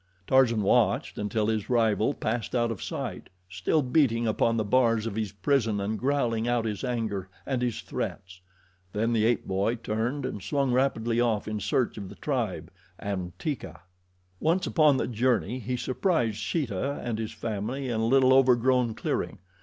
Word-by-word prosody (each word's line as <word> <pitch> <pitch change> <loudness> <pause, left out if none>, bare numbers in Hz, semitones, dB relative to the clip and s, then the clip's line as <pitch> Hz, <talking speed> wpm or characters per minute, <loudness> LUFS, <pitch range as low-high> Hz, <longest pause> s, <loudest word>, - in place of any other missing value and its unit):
Tarzan 120 -4 +4
watched - - +2
until 105 +1 0
his 110 -2 -1
rival 110 -3 +2
passed 115 +2 -2
out 120 -1 +2
of 110 - -6
sight, - - -5 0.2
still 145 - 0
beating 125 -4 +2
upon 115 +1 +1
the 110 - +1
bars 115 0 +2
of 115 - -3
his 110 -3 -2
prison 110 +1 +1
and 105 +2 -2
growling 120 -4 0
out 120 -1 +1
his 105 +1 -3
anger 110 -7 -2 0.2
and 130 -3 -1
his 120 -2 -1
threats. 95 0 -5 0.5
Then 115 +3 0
the 110 -1 +2
ape 120 -1 +1
boy 100 +5 0
turned 115 +5 -2
and 105 -6 -4
swung 140 +3 0
rapidly 120 -3 +1
off 115 -3 0
in 105 0 -2
search 120 0 0
of 100 -2 -7
the 100 - -11
tribe, 120 -9 -2 0.3
and 95 -3 -4
Teeka. 105 - -5 0.6
Once, 170 +4 +1
upon 150 -5 +4
the - - 0
journey, 120 -2 0
he 125 +2 -3
surprised 125 - 0
Sheeta 135 - -2
and 115 -2 -2
his 110 -1 -3
family 110 +5 -4
in 115 -3 -1
a 110 - +1
little 130 +1 +5
overgrown 125 -2 +4
clearing. - - -2
115 Hz, 170 wpm, -27 LUFS, 105-130 Hz, 0.6 s, little